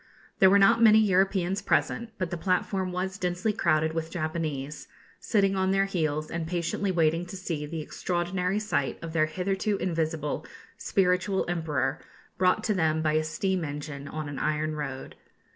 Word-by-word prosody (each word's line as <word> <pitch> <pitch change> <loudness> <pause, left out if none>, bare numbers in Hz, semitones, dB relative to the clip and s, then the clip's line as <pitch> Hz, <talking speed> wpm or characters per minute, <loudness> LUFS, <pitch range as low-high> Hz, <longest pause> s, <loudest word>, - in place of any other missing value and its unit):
There 190 - +7
were 200 - +6
not 225 +4 +5
many 220 -1 +8
Europeans 195 -2 +2
present; 235 0 0
but 185 -3 -3
the - - -1
platform 185 +1 0
was 185 +2 -3
densely 180 +4 0
crowded 160 -5 +1
with 165 0 -3
Japanese, 155 -4 -4 0.3
sitting 195 -3 +2
on 190 0 +1
their 195 0 +3
heels, 155 -5 -1
and 165 -1 -3
patiently 175 +3 -1
waiting 165 -1 +2
to 190 - -7
see 160 -5 -4
the 160 +1 -4
extraordinary 180 +4 -2
sight 210 -10 -1
of 165 -1 -6
their 155 -2 +3
hitherto 195 +5 -1
invisible 160 -4 -2 0.3
spiritual 185 +1 +1
Emperor 160 -5 -1 0.4
brought 185 +3 +3
to 220 - +1
them 160 -4 +1
by 155 -1 +2
a 155 0 +2
steam 185 +3 -1
engine 145 -1 -6
on 155 0 -5
an 145 -1 -5
iron 155 0 -1
road. 135 -3 -5
175 Hz, 165 wpm, -27 LUFS, 155-190 Hz, 0.4 s, many